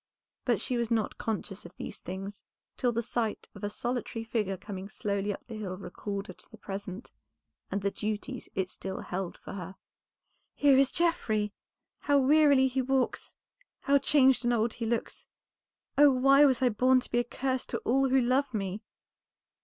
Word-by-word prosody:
But - - +2
she 250 - -1
was 235 -2 -1
not 225 -3 -1
conscious 210 -2 -4
of - - -13
these - - -7
things 195 +3 -7 0.3
till 245 -2 +1
the 235 0 -1
sight 230 -2 -2
of - - -12
a 205 - -1
solitary 235 +1 -3
figure 210 -4 -1
coming 195 0 -7
slowly 200 -1 -2
up - - -7
the 235 - -9
hill 200 -4 -5
recalled 200 0 -5
her - - -9
to - - -16
the 220 - -13
present 195 +1 -7 0.6
and 200 - -1
the 200 - +1
duties 215 +6 -4
it 185 -1 -1
still 190 0 -5
held 180 -1 -4
for - - -10
her. 190 -1 -7 0.8
"Here 285 -2 +5
is 270 0 +5
Geoffrey! 220 - +1 0.5
How 285 -1 +2
wearily 280 -1 +5
he 260 +1 0
walks, 265 0 -1 0.5
how 280 0 +4
changed 265 -2 +4
and 240 - +2
old 225 0 +1
he 230 -1 -4
looks, 235 0 -3 0.7
oh, 290 0 +9
why 275 +2 +6
was 260 -2 +2
I 250 - +5
born 255 +4 +4
to - - -7
be 240 - +2
a - - +2
curse 260 +1 -2
to - - -2
all 270 +2 +3
who 265 +1 +4
love 255 +1 +1
me!" 195 0 -3
235 Hz, 185 wpm, -29 LUFS, 205-260 Hz, 0.8 s, oh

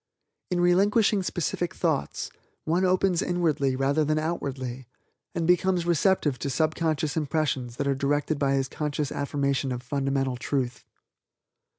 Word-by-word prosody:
"In 180 - 0
relinquishing 200 +4 +3
specific 175 -1 -2
thoughts, 160 -5 -1 0.3
one 170 +4 +1
opens 185 -1 +2
inwardly 155 -7 +1
rather 140 +4 +2
than 155 +1 +1
outwardly, 135 -6 -3 0.5
and 170 - 0
becomes 180 0 +2
receptive 170 -5 +2
to 140 - -2
subconscious 155 +1 0
impressions 145 -5 -1
that 140 +2 -2
are 140 - +3
directed 145 +2 0
by 140 -1 +2
his 135 -1 +1
conscious 150 0 -3
affirmation 140 -1 -1
of 125 0 -4
fundamental 135 -1 -1
Truth. 125 -1 -2
150 Hz, 130 wpm, -26 LUFS, 135-175 Hz, 0.5 s, relinquishing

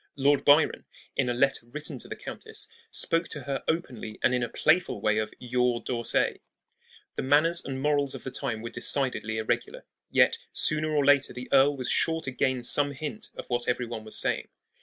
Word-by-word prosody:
Lord 140 0 +2
Byron, 145 +2 +4 0.3
in 130 -3 +1
a - - +1
letter 135 -2 +1
written 150 +1 -6
to - - -8
the - - -6
countess, - - -7 0.2
spoke 165 0 +1
to 150 - -5
her 135 0 -3
openly 130 -10 -3
and - - +3
in 125 - +1
a 120 - -2
playful 170 +9 +1
way 105 0 +1
of 110 - -3
"YOUR 125 -1 0
D'Orsay." 120 -2 0 0.7
The - - -3
manners 155 +5 +3
and 135 -1 -5
morals 145 -1 +1
of - - -9
the 130 - -5
time 110 -2 -3
were 115 - -6
decidedly 120 -3 -1
irregular; 110 - -2 0.2
yet - - +3
sooner 155 0 +3
or 150 -2 +1
later 145 -1 +4
the 125 0 -8
earl 140 +1 +5
was 130 -1 -1
sure 165 0 +2
to 135 - -4
gain 130 0 0
some 145 +3 +3
hint 155 +10 -5
of - - -7
what 120 -1 -1
every 125 0 0
one 115 -2 -6
was 110 - 0
saying. - - +1
135 Hz, 200 wpm, -27 LUFS, 120-145 Hz, 0.7 s, earl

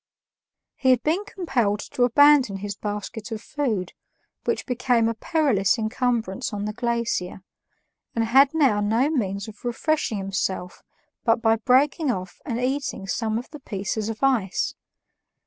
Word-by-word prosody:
He 260 - +1
had 250 -2 +4
been 345 +7 0
compelled 250 - -1
to - - -3
abandon 270 -4 +5
his 200 0 -5
basket 210 +2 -5
of 220 - -3
food, 220 -8 -2 0.5
which - - -1
became 245 -2 +1
a 230 - 0
perilous 235 - +1
incumbrance 225 -2 -1
on 205 -1 -3
the 210 - -3
glacier, 235 -6 -2 0.7
and 230 -1 +1
had 270 +4 +5
now 270 -10 +3
no 230 +8 +2
means 200 -8 -1
of 215 -1 -12
refreshing 245 0 0
himself 190 -2 -3 0.4
but 230 0 +3
by 225 -1 +3
breaking 270 +6 +2
off 185 -5 -4
and 235 -1 -2
eating 265 -5 -2
some 220 +2 -1
of 245 - -7
the 300 - -9
pieces 205 -2 -3
of 225 +3 -6
ice. 235 -9 +1
230 Hz, 145 wpm, -24 LUFS, 205-265 Hz, 0.7 s, abandon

